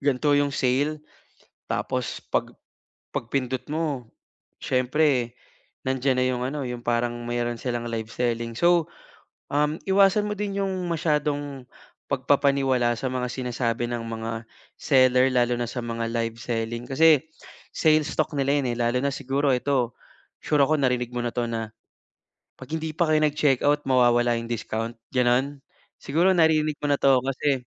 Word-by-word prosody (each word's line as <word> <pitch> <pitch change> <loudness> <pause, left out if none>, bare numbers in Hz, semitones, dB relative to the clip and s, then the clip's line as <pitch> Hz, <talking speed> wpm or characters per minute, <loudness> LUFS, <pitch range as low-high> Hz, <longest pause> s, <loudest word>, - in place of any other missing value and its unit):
gan'to 145 +1 +2
yung 145 0 +2
sale. 140 +4 0 0.7
Tapos - - -2
pag - - 0 0.6
pagpindot 130 +1 -2
mo, 150 -7 -2 0.5
siyempre 130 -1 +1 0.6
nandiyan 130 0 +1
na - - +3
yung 125 -1 -1
ano, 140 +3 -3
yung 125 -1 -5
parang 120 0 0
mayro'n 120 0 -2
silang 120 -2 -3
live 115 -1 -4
selling. 115 -1 -1
So, 170 +2 +3 0.6
um, 150 +2 +1
iwasan 195 +1 +4
mo - - -1
din 200 -1 -2
yung 195 - -1 0.2
masyadong 145 -4 -1 0.4
pagpapaniwala 135 -2 +2
sa 130 +1 -2
mga 125 -1 -2
sinasabi 120 -2 -2
ng 120 -1 -3
mga 115 0 -5 0.3
seller 130 -1 +4
lalo 120 -1 +2
na 120 - -1
sa 125 - -4
mga 115 0 -3
live 115 -1 -2
selling 115 0 -3
kasi 155 +2 +4 0.5
sales 155 -1 +3
talk 155 - +2
nila 140 +1 +2
'yon, 130 -3 -1
eh, - - -9
lalo 120 +1 +1
na 140 - +1
siguro 140 +1 0
ito, 125 -2 -1 0.4
sure 150 -2 +2
ako 155 +3 +3
narinig 125 -3 0
mo 120 - -2
na - - -1
'to 120 -1 0
na 115 -1 -3 0.9
'pag - - -11
hindi 160 0 -3
pa 170 - +3
kayo 155 0 +4
nag-checkout 145 -1 +2
mawawala 120 -2 +3
yung 115 - -7
discount, 115 0 -3 0.2
gano'n? 130 +2 +1 0.4
Siguro 170 +7 +2
naririnig 155 -3 +3
mo 145 - -2
na 145 - +3
'to 135 -2 +5
kasi 135 -1 -1
130 Hz, 150 wpm, -25 LUFS, 120-145 Hz, 0.9 s, to